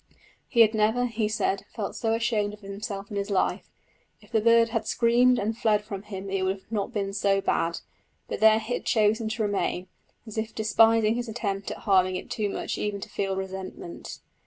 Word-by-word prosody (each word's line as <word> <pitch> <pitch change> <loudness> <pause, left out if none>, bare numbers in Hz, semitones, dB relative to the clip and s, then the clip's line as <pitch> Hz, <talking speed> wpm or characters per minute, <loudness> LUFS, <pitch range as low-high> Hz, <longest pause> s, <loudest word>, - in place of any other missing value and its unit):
He 235 - +4
had 220 0 +6
never, 220 +3 +2
he 225 -3 -1
said, 200 -2 0
felt 210 -4 -4
so 225 -1 0
ashamed 220 -3 0
of 210 - -25
himself 200 0 -6
in 205 - -3
his 200 +1 -2
life! 195 -2 0 0.5
If - - -21
the 220 -2 +2
bird 230 +1 +5
had 225 -1 -2
screamed 245 +2 +4
and 220 +1 -1
fled 215 -2 +2
from 200 -2 -6
him 195 -2 -7
it 195 -1 0
would 190 +1 -1
not 205 -3 -1
have - - -18
been 195 -1 -1
so 200 -1 +2
bad, 170 -3 0 0.5
but - - -4
there 220 0 +7
it 220 - 0
had 245 +3 -3
chosen 220 0 +2
to 220 0 -2
remain, 195 -3 -1 0.4
as 220 -1 -5
if 220 0 -4
despising 225 0 +4
his 240 0 -3
attempt 200 -3 -3
at - - -5
harming 185 -3 +2
it 185 - -6
too 210 -2 -1
much - - -3
even 205 -1 -2
to - - -8
feel 195 -1 -2
resentment. 190 - -6
215 Hz, 205 wpm, -26 LUFS, 195-225 Hz, 0.5 s, there